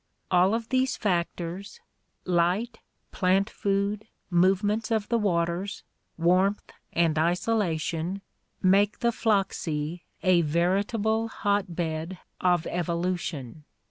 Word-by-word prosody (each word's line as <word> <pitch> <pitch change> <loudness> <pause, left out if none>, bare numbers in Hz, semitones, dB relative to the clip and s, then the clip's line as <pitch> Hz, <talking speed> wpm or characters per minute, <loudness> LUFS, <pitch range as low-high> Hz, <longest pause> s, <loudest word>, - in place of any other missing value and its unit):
All 185 +4 +4
of 230 0 -4
these 260 0 +1
factors, 180 - -2 0.5
light, 185 +7 +1 0.3
plant 190 +2 +2
food, 200 +2 -1 0.2
movements 195 +5 +2
of 220 -2 0
the 235 - +2
waters, 175 -1 -1 0.3
warmth, 185 +4 +2 0.2
and 165 -2 +2
isolation, 175 0 0 0.4
make 195 +2 +3
the 235 - +3
Flachsee 180 -8 -1 0.2
a 185 -2 +5
veritable 200 +8 +1
hot 200 -5 -1
bed 165 +1 -3 0.2
of 175 -3 +2
evolution. 170 -5 -3
185 Hz, 100 wpm, -27 LUFS, 170-205 Hz, 0.5 s, a